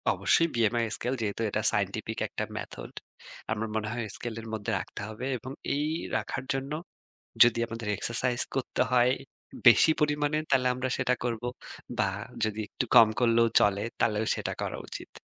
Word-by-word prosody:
অবশ্যই। 165 - +3
BMI 115 0 +2
scale 125 +2 -2
যেহেতু 105 0 -2
এটা 105 - -1
সায়েন্টিফিক 105 +1 -2
একটা - - -4
মেথড। - - -7 0.6
আমার 110 0 -1
মনে 110 -1 -1
হয় 120 -1 -3
স্কেলের 115 -1 -6
মধ্যে 105 -2 -2
রাখতে - - -7
হবে। 110 +3 -6
এবং 125 +3 -8 0.2
এই 145 +1 0 0.3
রাখার - - -4
জন্য 135 +1 -3 0.7
যদি 120 -1 +2
আমাদের 115 -1 -6
এক্সারসাইজ 120 +4 -1
করতে 135 - 0
হয় 125 0 +5 0.6
বেশি 120 +6 +8
পরিমাণে, 150 0 +1
তালে 130 -2 +3
আমরা 130 +1 -2
সেটা 125 -1 +2
করবো। 120 0 -2 0.5
বা 110 - +3 0.4
যদি 110 0 -2
একটু - - -2
কম 115 - +9
করলেও 115 -1 +4
চলে, 100 0 +3 0.2
তালেও 110 0 +2
সেটা - - -3
করা - - -3
উচিত। - - -8
115 Hz, 155 wpm, -28 LUFS, 110-125 Hz, 0.7 s, কম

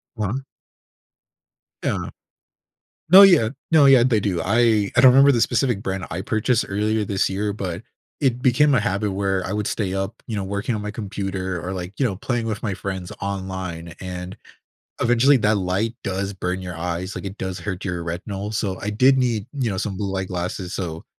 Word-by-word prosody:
Wha 105 -4 -2 1.5
Yeah. - - -1 1.0
No, 185 +3 +10
yeah. 170 - +6 0.2
No, 155 -3 +6
yeah, 135 -3 +7
they 120 -3 +3
do. 95 -4 -1
I 110 +1 +2
I 120 - +5
don't 130 -1 +9
remember 140 +2 +7
the 120 -4 +1
specific 120 -3 +1
brand 95 -2 -3
I 90 - -3
purchased 110 +4 0
earlier 105 +2 0
this 100 -1 0
year, 100 +2 -2
but, 95 -1 -5 0.4
it 125 -3 +1
became 140 +3 +4
a 125 - +4
habit 100 -1 -1
where 95 -1 -1
I - - -3
would 105 -1 -1
stay 95 -4 -2
up, 95 +3 -4
you 115 - -4
know, 100 - -2
working 100 +5 -2
on 105 - -3
my 105 - -4
computer 95 -4 -4
or, 90 - -4
like, 90 0 -5
you - - +2
know, 105 -6 -1
playing 115 +3 -2
with 110 -2 -4
my 100 -4 -1
friends 95 -2 -5
online, 95 -4 -5
and, 90 0 -6 0.7
eventually, 120 +4 +4
that 105 -1 +2
light 100 +5 -1
does 100 0 -2
burn 95 -1 -3
your 90 -2 -6
eyes, 90 +3 -4
like, - - -6
it 100 +1 -6
does 95 -1 -4
hurt 95 -3 -5
your 90 -3 -3
retinol, 100 +5 -5
so 100 -3 -2
I 105 - -3
did 130 +6 +4
need, 115 -5 0
you 130 -4 -1
know, - - -3
some 95 0 -3
blue-light 95 -2 -3
glasses, 90 0 -4
so, 80 -3 -5
100 Hz, 195 wpm, -22 LUFS, 95-115 Hz, 1.5 s, No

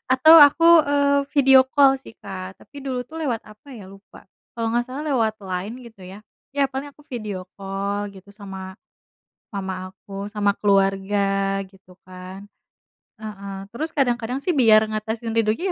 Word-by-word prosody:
atau 315 +5 +7
aku, 295 +3 +6 0.2
eee, 285 0 +2
video 270 -2 +7
call 270 0 +4
sih, 225 - -14
Kak, 190 -1 -7
tapi 285 - -13
dulu 260 -2 -3
tuh 320 +6 -10
lewat 245 -7 -1
apa 215 +6 -14
ya, 200 - -11
lupa. 195 0 -16 0.3
Kalo 225 -1 -2
gak 240 +1 0
salah 265 +3 -6
lewat 220 -4 +1
Line 190 +3 -4
gitu 225 -4 -15
ya? 195 +3 -11 0.3
Ya 280 - +3
paling 270 +2 -5
aku 295 - -22
video 210 -8 -6
call 200 +1 -3
gitu, 195 +1 -15
sama 190 -2 -9 0.8
mama 190 -1 -5
aku, 200 +1 -8
sama 205 -1 0
keluarga 195 0 +1
gitu 190 -1 -21
kan. 185 +2 -10 0.7
Heeh. 200 -2 -8 0.2
Terus 310 +6 -3
kadang-kadang 245 -2 0
sih, 360 - +1
biar 220 -6 +5
ngatasin 220 +1 -4
rindunya, 230 - 0
215 Hz, 155 wpm, -22 LUFS, 195-260 Hz, 0.8 s, atau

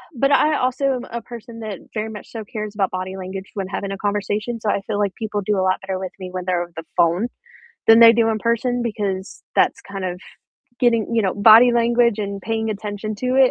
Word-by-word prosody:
but 275 +3 +2
I 300 +1 +4
also 255 +2 0
am 250 - -4
a 235 0 -4
person 235 0 -10
that 215 -4 -5 0.2
very 215 0 -3
much 210 -1 -10
so 225 -2 -6
cares 210 0 -6
about 195 -2 +1
body 185 +1 -4
language 190 0 -6
when 195 -2 -3
having 200 0 -4
a 195 - -4
conversation, 205 +3 -2
so 215 - -2
I 200 - +1
feel 205 +1 -3
like 200 -2 0
people 215 -2 -3
do 210 0 +1
a - - +1
lot 185 0 +1
better 190 -1 -4
with 185 -1 -5
me 185 -1 -6
when 185 0 -3
they're 180 -1 0
over 175 0 -13
the 165 - -6
phone 175 +6 +3 0.6
than 225 +1 +8
they 230 0 +10
do 230 -1 +2
in 220 -1 0
person, 240 +2 0
because 205 -4 -3
that's - - +2
kind 195 -1 -6
of 180 -1 -3 0.6
getting 230 -3 +2
you 225 - +3
know, 190 -2 +1
body 225 +4 +7
language 235 -1 +3
and 200 -1 -3
paying 225 +1 -2
attention 210 0 -4
to 250 +5 -3
it, 265 -1 +6
210 Hz, 235 wpm, -21 LUFS, 195-230 Hz, 0.6 s, they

